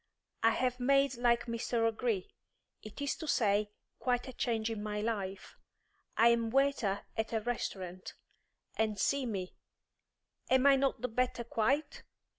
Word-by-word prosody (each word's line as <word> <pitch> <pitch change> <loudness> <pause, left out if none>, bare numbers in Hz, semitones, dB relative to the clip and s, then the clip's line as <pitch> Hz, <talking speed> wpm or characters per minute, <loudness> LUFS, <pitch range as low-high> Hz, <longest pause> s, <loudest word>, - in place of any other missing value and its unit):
I 225 - +6
have 250 +2 0
made 275 +1 +3
like 240 -1 +2
Mr. 230 0 0
O'Gree; 225 -3 -1 0.5
it 215 +6 -7
is 285 - 0
to 315 - -6
say, 210 -5 +2 0.3
quite 245 0 0
a 260 - -7
change 230 -2 -1
in 220 -2 -4
my 210 0 -3
life. 200 -3 -4 0.6
I 230 +1 +7
am 230 -1 +2
waiter 260 -6 +1
at 220 0 -2
a 220 - +1
restaurant. 185 -6 -4 0.6
And 215 -2 0
see 275 +4 +1
me; 190 -5 -4 1.0
am 260 +1 +4
I 280 -1 +8
not 270 -4 0
the 250 - 0
better 250 +1 -1
quite? 270 +7 0
230 Hz, 150 wpm, -33 LUFS, 215-255 Hz, 1.0 s, I